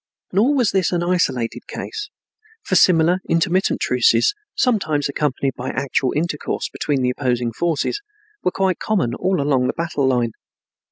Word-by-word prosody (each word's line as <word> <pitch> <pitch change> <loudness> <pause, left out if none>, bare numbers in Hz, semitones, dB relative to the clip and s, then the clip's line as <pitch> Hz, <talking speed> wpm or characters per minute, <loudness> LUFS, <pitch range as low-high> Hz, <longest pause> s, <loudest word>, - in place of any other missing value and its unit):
Nor 235 +10 +3
was 245 -6 +2
this 190 -2 +1
an 175 -1 0
isolated 170 -10 -1
case, 425 -2 -6 0.5
for 400 - -4
similar 175 0 +5
intermittent 170 +3 +1
truces, 435 -2 +3 0.2
sometimes 155 - +1
accompanied 140 -2 -1
by 125 - -5
actual 130 -1 0
intercourse 155 -1 -2
between 140 -3 -1
the 125 - +2
opposing 120 -3 -1
forces, 170 - -1 0.4
were - - +3
quite 190 0 0
common 185 - 0
all 185 -1 0
along 135 -3 +2
the - - -1
battle 160 -5 -1
line. 120 -3 +1
160 Hz, 150 wpm, -20 LUFS, 130-185 Hz, 0.5 s, similar